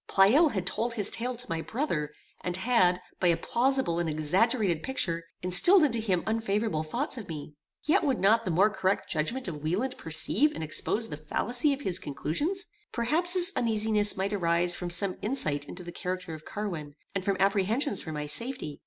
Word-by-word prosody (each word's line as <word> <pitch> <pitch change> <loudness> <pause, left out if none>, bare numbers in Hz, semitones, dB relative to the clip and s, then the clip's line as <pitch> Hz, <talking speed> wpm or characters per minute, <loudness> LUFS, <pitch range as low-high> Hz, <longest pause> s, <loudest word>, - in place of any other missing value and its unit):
Pleyel 245 - +4
had 190 -3 -2
told 235 +1 -2
his 210 -3 +3
tale 245 +2 -2
to 245 +1 -3
my 165 -4 -3
brother, 165 - -3 0.3
and 180 0 -2
had, 190 -4 +2 0.2
by 180 - +2
a 170 -1 +3
plausible 245 -3 0
and 170 -2 -1
exaggerated 175 +4 +1
picture, 170 -10 -2 0.2
instilled 310 - +6
into 240 -6 +2
him 190 -6 -1
unfavorable 220 -5 -1
thoughts 240 - -3
of 210 - -10
me. 150 -2 -7 0.3
Yet 310 - +2
would 270 -3 0
not 220 +4 +3
the 185 - -3
more 190 +6 +3
correct 190 -2 -1
judgment 195 +12 -2
of 150 -4 -6
Wieland 195 - -2
perceive 210 - +4
and 160 - -5
expose 210 +8 +2
the 150 - -6
fallacy 245 - -1
of 280 0 -3
his 185 -8 0
conclusions? 290 - -2 0.3
Perhaps 320 +10 +2
his 365 +2 +4
uneasiness 215 -3 +1
might 195 +2 -2
arise 175 -2 +2
from 175 -1 -5
some 185 +2 +3
insight 155 - -1
into 180 +4 -10
the 175 - -8
character 180 -1 -5
of 155 -1 -10
Carwin, 170 -9 -6 0.2
and 195 - -3
from 195 0 -1
apprehensions 200 +4 +1
for 160 - -7
my 150 -1 -4
safety. 155 - -2
195 Hz, 190 wpm, -28 LUFS, 170-240 Hz, 0.3 s, instilled